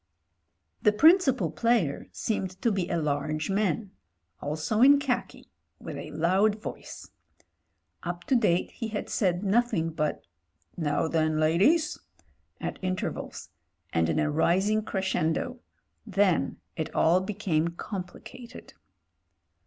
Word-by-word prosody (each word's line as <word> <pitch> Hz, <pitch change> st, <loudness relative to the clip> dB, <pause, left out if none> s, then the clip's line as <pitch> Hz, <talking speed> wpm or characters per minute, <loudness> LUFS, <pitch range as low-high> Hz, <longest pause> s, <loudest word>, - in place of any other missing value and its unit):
The 210 Hz, -, +5 dB
principal 295 Hz, -, +4 dB
player 230 Hz, -12 st, +1 dB
seemed 190 Hz, -4 st, -3 dB
to 235 Hz, -, +3 dB
be 190 Hz, -3 st, -1 dB
a 170 Hz, -, 0 dB
large 155 Hz, +2 st, -1 dB
man 200 Hz, 0 st, 0 dB, 0.2 s
— 85 Hz, +2 st, -43 dB
also 155 Hz, +9 st, -1 dB
in 280 Hz, +3 st, +8 dB
khaki 275 Hz, -3 st, -3 dB
— -, -, -49 dB
^with -, -, -7 dB
a -, -, -7 dB
loud 195 Hz, +6 st, +2 dB
voice. -, -, -8 dB, 0.9 s
Up 175 Hz, 0 st, -5 dB
to 265 Hz, -, +1 dB
date 205 Hz, -7 st, +2 dB
he 230 Hz, -, -5 dB
had 210 Hz, -1 st, -4 dB
said 180 Hz, -2 st, +1 dB
nothing 205 Hz, -5 st, +1 dB
but 155 Hz, -1 st, -2 dB, 0.5 s
''Now 155 Hz, -1 st, 0 dB
then, 155 Hz, -1 st, +1 dB
ladies/' 195 Hz, -, +3 dB, 0.6 s
at -, -, -4 dB
intervals, 185 Hz, 0 st, -4 dB, 0.4 s
and 80 Hz, 0 st, +2 dB
in -, -, 0 dB
a 155 Hz, -1 st, +1 dB
rising 190 Hz, +7 st, +2 dB
crescendo. 190 Hz, +3 st, -1 dB, 0.5 s
Then 195 Hz, -3 st, +1 dB, 0.2 s
it 160 Hz, -, -3 dB
all 175 Hz, +3 st, +4 dB
became 190 Hz, -5 st, -1 dB
complicated. 195 Hz, +7 st, -8 dB
185 Hz, 125 wpm, -27 LUFS, 160-215 Hz, 0.9 s, in